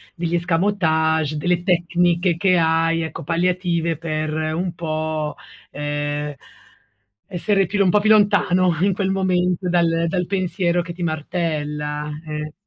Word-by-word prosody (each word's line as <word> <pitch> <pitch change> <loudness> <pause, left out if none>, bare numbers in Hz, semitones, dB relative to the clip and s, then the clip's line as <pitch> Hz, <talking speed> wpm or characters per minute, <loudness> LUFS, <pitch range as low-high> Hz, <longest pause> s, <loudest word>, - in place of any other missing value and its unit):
degli 170 0 -2
escamotage, 160 -4 +1
delle 175 +3 0
tecniche 175 -1 +1
che 185 0 +3
hai, 165 0 +2
ecco, 160 - -5
palliative 170 0 0
per 155 -1 -3 0.2
un 175 +1 -2
po', 155 -2 -3 0.4
ehm, 145 0 -3 0.9
essere 195 +1 +1
più 200 +3 +1
un 185 - +3
po' 210 - +4
più 215 +1 +1
lontano 185 -4 +3
in 195 +1 +3
quel 190 0 -1
momento, 180 -1 0
dal 170 -1 +2
dal 180 +1 -1
pensiero 180 -2 0
che 170 0 -7
ti 175 +1 -6
martella, 150 -2 -3 0.2
eh 150 0 -5
170 Hz, 135 wpm, -21 LUFS, 155-180 Hz, 0.9 s, po